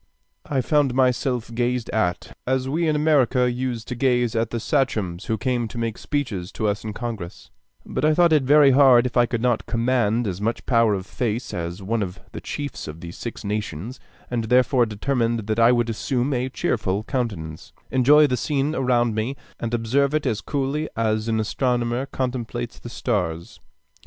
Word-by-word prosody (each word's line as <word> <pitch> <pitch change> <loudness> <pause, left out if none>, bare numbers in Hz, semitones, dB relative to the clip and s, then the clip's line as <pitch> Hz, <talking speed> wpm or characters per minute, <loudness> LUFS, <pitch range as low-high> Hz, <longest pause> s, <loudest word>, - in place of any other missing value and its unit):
I 135 -3 0
found 140 -1 +2
myself 125 -2 +1
gazed 120 0 -1
at, 90 -6 -1
as 130 0 0
we 160 +5 0
in 155 - +2
America 135 -5 +3
used 120 -2 -3
to 125 - -3
gaze 120 -2 +1
at 115 0 0
the 120 - -3
sachems 110 - -1
who 110 - -1
came 125 -2 -1
to 115 - -9
make 115 -1 -3
speeches 110 -12 -3
to 110 - -1
us 105 0 -1
in 110 - -4
Congress; 110 -6 -6 0.3
but - - -3
I 155 0 +4
thought 170 -1 +4
it 150 - +5
very 140 +1 +6
hard 130 -3 +6
if 125 - -3
I 120 -1 +4
could 120 -1 -2
not 120 -3 +1
command 120 -1 +1
as 95 -1 -3
much 115 +3 -2
power 115 -4 +3
of 95 -1 -5
face 120 +2 -3
as 85 +3 -4
one 110 +3 -1
of 90 -2 -4
the - - -7
chiefs 145 - -5
of 75 +1 -8
the 85 - -7
Six 120 +7 -7
Nations, 105 - -4 0.3
and 120 -2 -2
therefore 125 +1 +3
determined 115 0 -1
that 110 +1 -1
I 115 +1 +6
would 120 -1 +2
assume 125 +4 -1
a 125 +1 -1
cheerful 105 -5 -1
countenance, 100 - -4 0.2
enjoy 145 +4 +6
the 130 -3 +1
scene 145 +4 0
around 120 -4 +1
me, 110 +5 -2 0.2
and 115 - -3
observe 130 +5 +1
it 155 - 0
as 110 - 0
coolly 145 +2 -2
as 110 -1 0
an 110 -1 +1
astronomer 120 +3 0
contemplates 120 -2 -4
the 120 - -9
stars. 90 -9 -3
120 Hz, 185 wpm, -23 LUFS, 110-130 Hz, 0.3 s, very